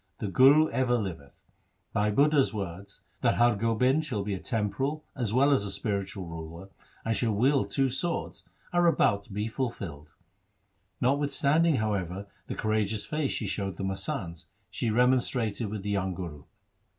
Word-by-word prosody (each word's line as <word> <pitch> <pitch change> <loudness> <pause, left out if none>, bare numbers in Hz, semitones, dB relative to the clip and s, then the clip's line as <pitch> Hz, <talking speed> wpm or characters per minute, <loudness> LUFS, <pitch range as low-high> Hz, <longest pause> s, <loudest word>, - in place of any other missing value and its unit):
The 105 - -3
Guru 140 +8 +6
ever 125 -2 +2
liveth. 85 -10 -6 0.5
Bhai 105 +1 +2
Budha's 140 +3 +4
words, 100 -1 -6 0.2
that 120 -3 +3
Har 120 -1 +4
Gobind 115 +7 +2
shall 120 -10 -2
be 100 0 -2
a 95 - -3
temporal 135 +10 -2
as 120 -6 -1
well 135 +5 +4
as 100 -8 +1
spiritual 100 -2 -3
ruler 85 +3 -8 0.4
and 115 0 +1
shall 110 -3 0
wield 135 +6 +2
two 135 -2 +1
swords, 170 +7 -3 0.3
are 175 0 +4
about 100 -11 +3
to - - -16
be 105 +2 -2
fulfilled.' 100 - -5 0.9
Notwithstanding, 145 +4 +2
however, 100 -4 -2 0.2
the - - -4
courageous 110 -1 0
face 150 -3 -1
she 110 - -3
showed 95 -2 -3
the - - -4
masands, 95 - -3 0.2
she 120 - -1
remonstrated 120 -2 +1
with 105 -2 -5
the 105 - -2
young 95 -2 -1
Guru. 80 -6 -7
110 Hz, 155 wpm, -28 LUFS, 100-130 Hz, 0.9 s, Guru